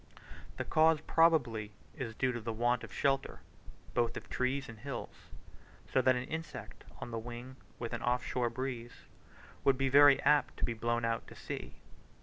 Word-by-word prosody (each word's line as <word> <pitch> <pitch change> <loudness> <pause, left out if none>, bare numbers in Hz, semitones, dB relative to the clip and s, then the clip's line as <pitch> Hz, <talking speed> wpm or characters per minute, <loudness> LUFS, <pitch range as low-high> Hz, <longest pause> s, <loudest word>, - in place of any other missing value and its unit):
The - - -3
cause 160 0 +4
probably 125 -12 +2 0.2
is 120 -6 -5
due 130 +2 +1
to 120 -1 -4
the 115 +1 -3
want 120 +2 +1
of - - -9
shelter, 135 -1 0 0.5
both 120 -1 +1
of - - -9
trees 130 +2 0
and 115 -2 -10
hills, 135 0 -6 0.8
so 130 - +5
that 130 0 +4
an 125 - -2
insect 160 +3 -7 0.2
on 120 - -6
the 115 - -2
wing 120 +3 -8 0.2
with 120 0 -5
an 120 - -3
off 125 0 +1
shore 120 -1 0
breeze, 120 -1 -5 0.6
would 135 -1 +4
be 135 0 +1
very 145 +1 +8
apt 150 0 +3
to - - 0
be 120 - -2
blown 120 +1 -1
out 115 0 -1
to - - -12
sea. - - -6
125 Hz, 180 wpm, -33 LUFS, 115-135 Hz, 0.8 s, very